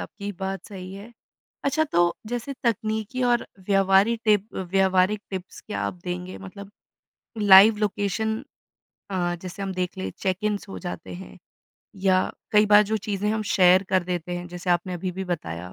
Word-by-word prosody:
आपकी 200 Hz, -1 st, -6 dB
बात 195 Hz, 0 st, -4 dB
सही 185 Hz, -2 st, -8 dB
है। 205 Hz, +4 st, -10 dB, 0.5 s
अच्छा, 300 Hz, +3 st, +2 dB
तो 175 Hz, -, +2 dB
जैसे 245 Hz, +4 st, -4 dB
तकनीकी 220 Hz, +2 st, -1 dB
और 240 Hz, -1 st, +2 dB, 0.2 s
व्यावहारी 195 Hz, +3 st, +4 dB
टिप 210 Hz, 0 st, +2 dB
व्यावहारिक 190 Hz, +2 st, +2 dB
टिप्स 190 Hz, -1 st, -7 dB
क्या 215 Hz, -, -4 dB
आप -, -, -2 dB
देंगे? 180 Hz, +1 st, -5 dB
मतलब 195 Hz, +1 st, -10 dB, 0.7 s
लाइव 205 Hz, +1 st, +8 dB
लोकेशन 215 Hz, +2 st, -1 dB, 0.7 s
अ, 175 Hz, -2 st, 0 dB
जैसे 185 Hz, +2 st, -7 dB
हम 195 Hz, -, -3 dB
देख 180 Hz, +1 st, -3 dB
लें, 190 Hz, -, -3 dB
चेक-इन्स 200 Hz, +2 st, -1 dB
हो 195 Hz, -, -7 dB
जाते 175 Hz, -3 st, -7 dB
हैं 190 Hz, +2 st, -10 dB, 0.7 s
या 190 Hz, -1 st, +4 dB, 0.4 s
कई 210 Hz, 0 st, +5 dB
बार 210 Hz, 0 st, +7 dB
जो 215 Hz, +1 st, -1 dB
चीज़ें 205 Hz, -1 st, -2 dB
हम 220 Hz, 0 st, -1 dB
शेयर 185 Hz, 0 st, +6 dB
कर 185 Hz, -1 st, +2 dB
देते 175 Hz, -1 st, -3 dB
हैं, 175 Hz, 0 st, -6 dB
जैसे 180 Hz, +1 st, -4 dB
आपने 175 Hz, +1 st, +1 dB
अभी 180 Hz, +1 st, -3 dB
भी 190 Hz, +1 st, -4 dB
बताया, 90 Hz, -, -5 dB
195 Hz, 165 wpm, -25 LUFS, 185-210 Hz, 0.7 s, लाइव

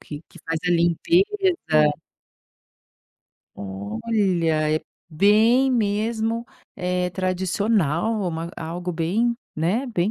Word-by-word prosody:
Que 150 Hz, +1 st, -9 dB
que -, -, -16 dB
faz 165 Hz, 0 st, -2 dB
a -, -, +2 dB
limpeza 175 Hz, -, +3 dB, 2.3 s
Olha, 155 Hz, -, -1 dB
é -, -, -6 dB, 0.2 s
bem 215 Hz, +10 st, +4 dB
mesmo, 225 Hz, 0 st, 0 dB, 0.3 s
eh, 180 Hz, 0 st, -1 dB
tradicional. 190 Hz, +1 st, 0 dB
Uma 165 Hz, 0 st, -4 dB
algo 175 Hz, +2 st, -4 dB
bem, 205 Hz, +9 st, 0 dB, 0.2 s
né, 190 Hz, -, 0 dB
bem 210 Hz, -4 st, 0 dB
180 Hz, 95 wpm, -23 LUFS, 165-225 Hz, 2.3 s, bem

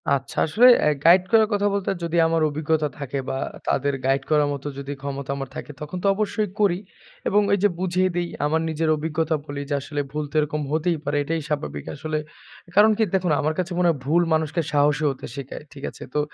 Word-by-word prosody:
আচ্ছা 135 Hz, -1 st, -1 dB
আসলে 195 Hz, +11 st, +4 dB, 0.2 s
অ্যা -, -, +3 dB, 0.2 s
গাইড 180 Hz, +2 st, +7 dB
করার 220 Hz, -1 st, +6 dB
কথা 205 Hz, 0 st, +2 dB
বলতে 200 Hz, -1 st, -1 dB
যদি 170 Hz, 0 st, -1 dB
আমার 165 Hz, 0 st, +1 dB
অভিজ্ঞতা 155 Hz, +1 st, 0 dB
থাকে, 140 Hz, -1 st, -4 dB
বা 135 Hz, -, -2 dB, 0.3 s
তাদের 140 Hz, +1 st, +1 dB
গাইড 135 Hz, +1 st, +2 dB
করার 150 Hz, -2 st, +3 dB
মতো 140 Hz, +1 st, -6 dB
যদি 140 Hz, 0 st, -5 dB
ক্ষমতা 140 Hz, -1 st, -4 dB
আমার 135 Hz, -1 st, -5 dB
থাকে -, -, -6 dB
তখন 150 Hz, +4 st, -5 dB
তো -, -, +2 dB
অবশ্যই 210 Hz, 0 st, -1 dB
করি 195 Hz, -4 st, +3 dB, 0.5 s
এবং 205 Hz, +1 st, +4 dB
ওই 200 Hz, -, +4 dB
যে 205 Hz, -, +6 dB
বুঝিয়ে 185 Hz, 0 st, +1 dB
দিই 175 Hz, 0 st, 0 dB, 0.2 s
আমার 160 Hz, +2 st, +1 dB
নিজের 160 Hz, 0 st, 0 dB
অভিজ্ঞতা 160 Hz, +1 st, -1 dB
বলি 145 Hz, -1 st, -5 dB
যে, -, -, 0 dB
আসলে 145 Hz, +1 st, -3 dB
ভুল 150 Hz, +1 st, -2 dB
তো -, -, -15 dB
এরকম 150 Hz, 0 st, -1 dB
হতেই 160 Hz, +2 st, +1 dB
পারে। 145 Hz, +1 st, 0 dB
এটাই 165 Hz, +2 st, -2 dB
স্বাভাবিক 75 Hz, -, -3 dB
আসলে 155 Hz, +1 st, -3 dB, 0.6 s
কারণ 210 Hz, +2 st, +7 dB
কি 225 Hz, -, +3 dB
দেখুন 185 Hz, -3 st, +1 dB
আমার 155 Hz, +1 st, 0 dB
কাছে 180 Hz, 0 st, -2 dB
মনে 180 Hz, -1 st, +3 dB
হয় 165 Hz, -, +1 dB
ভুল 165 Hz, +5 st, +3 dB
মানুষকে 160 Hz, +1 st, +1 dB
সাহসী 145 Hz, +1 st, +2 dB
হতে 135 Hz, -, -6 dB
শিখায়। 140 Hz, +1 st, -7 dB
ঠিক 140 Hz, -2 st, -12 dB
আছে? -, -, -11 dB
তো 150 Hz, -, +1 dB
155 Hz, 215 wpm, -23 LUFS, 145-175 Hz, 0.6 s, গাইড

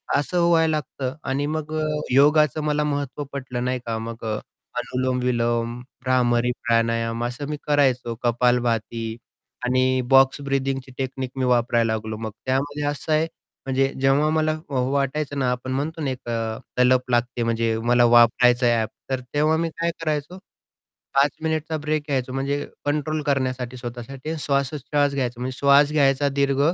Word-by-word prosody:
असं 170 Hz, +5 st, +1 dB
व्हायला 165 Hz, -1 st, +4 dB
लागतं 135 Hz, -3 st, -3 dB
आणि 140 Hz, +2 st, 0 dB
मग 155 Hz, 0 st, -4 dB
अ, 155 Hz, -, 0 dB, 0.3 s
योगाचं 150 Hz, +2 st, +4 dB
मला 150 Hz, 0 st, +1 dB
महत्त्व 145 Hz, -1 st, -2 dB
पटलं 125 Hz, -2 st, -4 dB
नाही 125 Hz, 0 st, -1 dB
का? 115 Hz, -1 st, -2 dB
मग 115 Hz, 0 st, -7 dB
अ, 110 Hz, -1 st, -1 dB, 0.4 s
अनुलोम-विलोम, 120 Hz, -2 st, -1 dB, 0.2 s
भ्रामरी 125 Hz, -1 st, +2 dB
प्राणायाम 115 Hz, 0 st, +1 dB
असं 125 Hz, +4 st, -4 dB
मी 150 Hz, -, -3 dB
करायचो. 130 Hz, -5 st, +2 dB
कपालभाती 120 Hz, -2 st, 0 dB, 0.5 s
आणि 130 Hz, +1 st, +2 dB
बॉक्स 135 Hz, +1 st, +5 dB
ब्रिदिंगची 135 Hz, -1 st, -2 dB
टेक्निक 130 Hz, -1 st, -3 dB
मी 130 Hz, -, +1 dB
वापरायला 120 Hz, -2 st, +2 dB
लागलो 110 Hz, 0 st, -4 dB
मग. 110 Hz, -1 st, -5 dB
त्यामध्ये 145 Hz, +3 st, -1 dB
असं 150 Hz, +2 st, -5 dB
आहे 160 Hz, +1 st, +2 dB, 0.4 s
म्हणजे 135 Hz, 0 st, +1 dB
जेव्हा 140 Hz, +3 st, +3 dB
मला 155 Hz, 0 st, +1 dB
वाटायचं 140 Hz, +2 st, -1 dB
ना, 130 Hz, -2 st, +1 dB
आपण 125 Hz, +1 st, -4 dB
म्हणतो 155 Hz, +4 st, -2 dB
ना 140 Hz, -, -1 dB
एक 125 Hz, -2 st, -7 dB, 0.5 s
तलप 125 Hz, 0 st, +3 dB
लागते, 120 Hz, 0 st, +1 dB
म्हणजे 115 Hz, -1 st, 0 dB
मला 120 Hz, 0 st, +4 dB
वापरायचं 120 Hz, +1 st, +5 dB
आहे 120 Hz, -1 st, +4 dB
ॲप, 110 Hz, -1 st, 0 dB, 0.2 s
तर 130 Hz, -1 st, 0 dB
तेव्हा 155 Hz, +2 st, +3 dB
मी 165 Hz, 0 st, 0 dB
काय 170 Hz, 0 st, 0 dB
करायचो 155 Hz, +3 st, -2 dB, 0.8 s
5 140 Hz, +1 st, +5 dB
मिनिटचा 160 Hz, 0 st, -1 dB
ब्रेक 155 Hz, 0 st, -1 dB
घ्यायचो 130 Hz, -3 st, -1 dB
म्हणजे 140 Hz, +2 st, -1 dB, 0.2 s
कंट्रोल 150 Hz, +1 st, -1 dB
करण्यासाठी 130 Hz, -3 st, -1 dB
स्वतःसाठी 125 Hz, +4 st, -7 dB
आणि 160 Hz, -, -3 dB
श्वासोच्छवास 140 Hz, +1 st, 0 dB
घ्यायचा, 125 Hz, -3 st, -2 dB
म्हणजे 130 Hz, +1 st, -4 dB
श्वास 140 Hz, +1 st, +5 dB
घ्यायचा 140 Hz, -1 st, +3 dB
दीर्घ, 140 Hz, 0 st, +1 dB
130 Hz, 155 wpm, -23 LUFS, 120-145 Hz, 0.8 s, बॉक्स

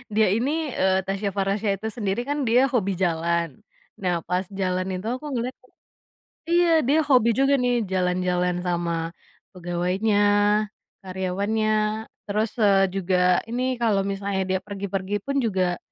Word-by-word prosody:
dia 215 Hz, -2 st, +4 dB
ini 295 Hz, +5 st, -1 dB
eee, 190 Hz, -4 st, +1 dB
Tasya 195 Hz, 0 st, -2 dB
Farahsya 200 Hz, +2 st, 0 dB
itu 220 Hz, -, -2 dB
sendiri 205 Hz, 0 st, -2 dB
kan 290 Hz, -2 st, -1 dB
dia 250 Hz, +4 st, +4 dB
hobi 200 Hz, -7 st, 0 dB
jalan. 170 Hz, -4 st, -1 dB, 0.4 s
Nah, 175 Hz, -3 st, -1 dB
pas 180 Hz, +1 st, 0 dB
jalan 185 Hz, -1 st, -1 dB
itu 185 Hz, +4 st, -5 dB
aku 255 Hz, +5 st, -4 dB
ngeliat 250 Hz, +2 st, -2 dB
tuh 255 Hz, -, -26 dB, 0.8 s
iya, 340 Hz, -2 st, +4 dB
dia 285 Hz, +5 st, +2 dB
hobi 250 Hz, -5 st, +4 dB
juga 275 Hz, +1 st, +3 dB
nih 245 Hz, -3 st, +1 dB
jalan-jalan 180 Hz, -1 st, 0 dB
sama 170 Hz, -1 st, -2 dB, 0.4 s
pegawainya, 180 Hz, +4 st, -1 dB, 0.9 s
karyawannya. 195 Hz, +4 st, -1 dB, 0.6 s
Terus, 215 Hz, +1 st, 0 dB
eee, 200 Hz, -3 st, +4 dB
juga 185 Hz, -1 st, -1 dB, 0.3 s
ini 250 Hz, +2 st, -2 dB
kalau 215 Hz, -4 st, +2 dB
misalnya 195 Hz, 0 st, -2 dB
dia 190 Hz, 0 st, +1 dB
pergi-pergi 200 Hz, 0 st, -3 dB
pun 275 Hz, +3 st, -2 dB
juga, 190 Hz, -8 st, 0 dB
195 Hz, 140 wpm, -24 LUFS, 185-235 Hz, 0.9 s, dia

